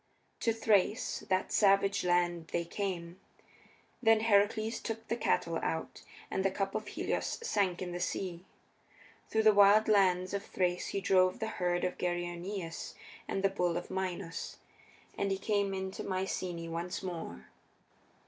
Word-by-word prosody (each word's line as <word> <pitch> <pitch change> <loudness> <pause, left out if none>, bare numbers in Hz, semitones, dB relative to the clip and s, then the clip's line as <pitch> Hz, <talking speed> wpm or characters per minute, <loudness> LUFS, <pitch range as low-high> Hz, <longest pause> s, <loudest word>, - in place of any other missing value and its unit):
To 230 - +2
Thrace, 220 -2 +2
that 185 0 +1
savage 195 0 +4
land, 175 -2 +1
they 170 +1 -2
came. 175 -1 -4 0.8
Then 225 -2 +5
Heracles 215 +1 +2
took 225 0 -5
the 230 - +1
cattle 170 -7 0
out, 160 - -3 0.3
and 190 - 0
the 195 - +3
cup 195 +1 -2
of - - -3
Helios - - -2
sank 190 - 0
in 180 - -5
the 175 - -4
sea. 180 -1 -3 0.9
Through 220 0 +2
the 215 -1 +7
wild 205 +2 +6
lands 185 -3 +3
of 200 0 -2
Thrace 180 -2 -1
he 195 - -2
drove 185 -1 +3
the - - -2
herd 175 -3 -1
of 180 - -2
Geryoneus 175 0 -3 0.3
and 195 - -2
the 195 - +4
bull 180 -3 0
of 175 - -6
Minos, 185 -2 -4 0.6
and 200 - +1
he 195 - 0
came 200 -1 0
into 190 0 -4
Myceaæ 185 -2 -3
once 170 +3 -4
more. 165 - -6
190 Hz, 150 wpm, -32 LUFS, 175-200 Hz, 0.9 s, the